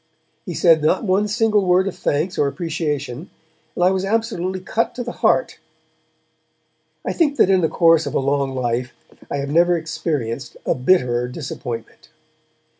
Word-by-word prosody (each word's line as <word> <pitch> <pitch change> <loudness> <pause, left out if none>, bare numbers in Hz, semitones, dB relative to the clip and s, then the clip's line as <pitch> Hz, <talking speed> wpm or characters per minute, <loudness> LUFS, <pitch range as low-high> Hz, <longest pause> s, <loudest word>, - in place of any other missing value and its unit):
He 175 - -4
said 165 -3 +4
not 170 +7 +2
one 205 +1 +1
single 215 -1 +2
word 185 +1 +3
of 195 - -4
thanks 160 +6 -1
or 145 - +3
appreciation, 150 -2 -3 0.5
and 175 - 0
I 180 - +5
was 190 0 -1
absolutely 195 -3 -1
cut 225 +5 -1
to 245 - -4
the 240 - -5
heart. - - +1 1.5
I - - -1
think 295 -4 +1
that 190 - +4
in 190 -1 +4
the 160 - +1
course 165 -3 +4
of 140 - -4
a - - +3
long 140 0 0
life 120 -1 -2 0.4
I - - -2
have 140 0 -3
never 175 +2 +4
experienced 155 -7 -4
a - - +2
bitterer 125 -4 +2
disappointment. 125 -3 -7
165 Hz, 165 wpm, -20 LUFS, 140-190 Hz, 1.5 s, I